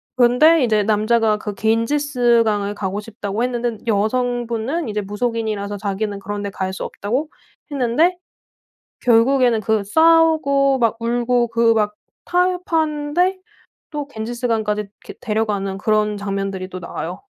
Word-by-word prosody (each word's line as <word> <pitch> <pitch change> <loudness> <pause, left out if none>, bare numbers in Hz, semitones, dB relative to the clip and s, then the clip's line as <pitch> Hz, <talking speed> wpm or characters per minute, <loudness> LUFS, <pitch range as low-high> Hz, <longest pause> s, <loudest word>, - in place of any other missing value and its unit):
근데 255 +6 +5
이제 215 -3 +2
남자가 215 +1 +2
그 210 -1 -5
갠지스강을 230 -2 +1
가고 200 0 -3
싶다고 210 0 -4
했는데 240 -2 -2
여성분은 240 +6 -1
이제 210 0 -2
무속인이라서 210 -1 -3
자기는 200 0 -3
그런 205 +1 -5
데 200 - -3
갈 190 -1 -4
수 - - -5
없다고 255 +10 -3 0.4
했는데 285 +7 +2 0.9
결국에는 245 0 +4
그 215 0 0
싸우고 310 0 +4
막 230 -2 +2
울고 240 +1 +1
그 230 0 +3
막 210 -1 0 0.3
타협하는데 355 -1 0 0.5
또 295 -2 -5
갠지스강까지 225 -3 -2
이렇게 205 -1 -11
데려가는 210 -3 -1
그런 210 0 +1
장면들이 195 -2 -3
또 185 -1 -7
나와요. 170 0 -6
230 Hz, 310 characters per minute, -20 LUFS, 210-255 Hz, 0.9 s, 근데